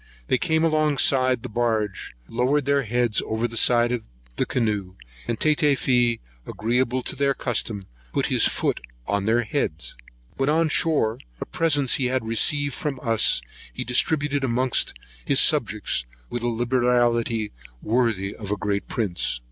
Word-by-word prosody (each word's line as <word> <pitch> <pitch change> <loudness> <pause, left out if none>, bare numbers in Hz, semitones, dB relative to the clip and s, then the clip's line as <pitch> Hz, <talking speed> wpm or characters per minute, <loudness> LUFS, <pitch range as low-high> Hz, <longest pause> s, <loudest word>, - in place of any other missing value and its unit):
They 130 - +2
came 160 0 +1
alongside 140 -5 +2
the - - -4
barge, 110 - -2
lowered 130 +4 0
their 140 0 +2
heads 120 -2 +1
over 110 +2 -1
the 115 - -9
side 120 +1 +4
of 120 -2 -3 0.3
the - - -1
canoe, 105 -6 -1 0.3
and 115 - -2
Tatafee, 130 -6 +2 0.3
agreeable 125 +3 0
to - - -3
their 140 0 +1
custom, 110 -5 -2 0.3
put - - 0
his - - +3
foot - - -1 0.2
upon 100 +7 -1
their 115 +2 +2
heads. 105 - -3 0.4
When 135 +1 +1
on 160 +1 +2
shore, 145 -9 +1 0.2
what - - -8
presents 145 -6 +2
he 130 - -1
had 125 -2 -1
received 140 +5 +1
from 150 -6 -4
us, 115 - +2 0.3
he - - -5
distributed 145 +3 0
amongst 130 0 +1 0.3
his - - +3
subjects, - - +2 0.3
with 120 - -3
a 120 - -1
liberality 120 -2 +1 0.3
worthy 110 -4 0
of 105 -3 -8
a 105 - -1
great 100 0 -2
prince. 90 - -1
120 Hz, 150 wpm, -24 LUFS, 110-135 Hz, 0.4 s, side